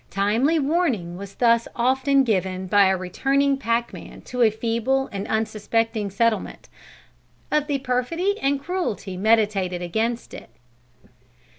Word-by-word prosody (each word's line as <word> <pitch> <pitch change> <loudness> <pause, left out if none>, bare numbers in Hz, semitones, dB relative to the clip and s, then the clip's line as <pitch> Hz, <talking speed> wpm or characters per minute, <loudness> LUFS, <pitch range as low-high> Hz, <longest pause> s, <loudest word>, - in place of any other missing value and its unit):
Timely 225 +11 +1
warning 275 - 0
was 195 +1 -9
thus 235 -1 +3
often 265 +3 +2
given 190 -5 -1
by 200 +2 +4
a 190 0 +2
returning 275 +10 +1
packman 235 -3 -3
to 250 0 -4
a 230 - +6
feeble 230 +5 -1
and 200 0 -5
unsuspecting 220 0 -1
settlement, 220 +3 -1 0.8
of 300 -1 +1
the 285 -2 0
perfidy 275 +10 -1
and 275 +1 +1
cruelty 280 - -3
meditated 195 -3 +1
against 225 +7 -2
it." - - -10
230 Hz, 125 wpm, -23 LUFS, 200-270 Hz, 0.8 s, a